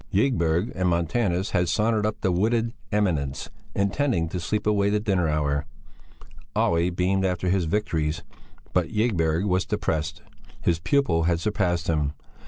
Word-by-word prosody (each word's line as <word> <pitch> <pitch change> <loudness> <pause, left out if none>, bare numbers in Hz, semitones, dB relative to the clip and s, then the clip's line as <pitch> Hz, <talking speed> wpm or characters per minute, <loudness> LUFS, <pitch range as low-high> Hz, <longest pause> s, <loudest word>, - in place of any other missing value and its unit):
Ygberg 95 -4 +1
and 90 -1 0
Montanus 90 +3 0
had 90 -3 +1
sauntered 110 +2 +2
up 110 - -4
the 95 - +2
wooded 115 +5 +1 0.2
eminence, 85 -10 -1 0.2
intending 100 - +1
to 90 - -3
sleep 105 +5 -2
away 100 -1 +2
the 105 +1 +2
dinner 95 -5 +1
hour; 70 -2 0 0.9
Olle 85 +1 +2
beamed 90 +2 0
after 90 -1 0
his 95 -1 +2
victories, 80 -3 -1 0.5
but - - +2
Ygberg 90 -6 +1
was 95 -2 +2
depressed; 80 0 -2 0.4
his 85 -2 +1
pupil 85 - +2
had 85 -1 +2
surpassed 90 -3 0
him. 75 -3 0
90 Hz, 145 wpm, -25 LUFS, 80-105 Hz, 0.9 s, sauntered